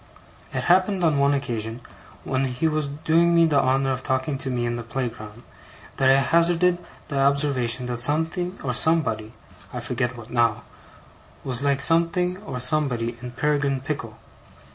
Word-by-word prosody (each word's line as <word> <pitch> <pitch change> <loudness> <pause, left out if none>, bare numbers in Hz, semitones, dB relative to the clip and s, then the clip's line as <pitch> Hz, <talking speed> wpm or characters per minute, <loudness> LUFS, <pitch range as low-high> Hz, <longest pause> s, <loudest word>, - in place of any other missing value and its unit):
It - - -3
happened 185 +1 +2
on 155 -4 +2
one 140 +1 +3
occasion, 115 -4 -4 0.4
when 135 0 -1
he 130 +5 -1
was 155 -2 -1
doing 160 +4 +2
me 170 0 +5
the 145 -4 +3
honour 135 +1 +1
of 130 0 -2
talking 130 +2 -1
to 135 - -3
me 120 -2 -1
in 120 0 -2
the 120 - -4
playground, 115 -2 -6 0.5
that 130 - +3
I 135 - +6
hazarded 170 +4 +2 0.3
the 140 -3 -2
observation 135 -3 +1
that 120 -1 -4
something 160 +7 0
or 130 -2 -2
somebody 115 -7 +1 0.4
I - - -5
forget 125 0 -3
what 115 0 -11
now 115 -3 +1 0.8
was 130 -2 -3
like 140 0 +1
something 170 +3 +3
or 185 -11 -7
somebody 125 -4 0
in 125 -1 -8
Peregrine 140 0 0
Pickle. 130 -6 -5
135 Hz, 165 wpm, -23 LUFS, 125-160 Hz, 0.8 s, I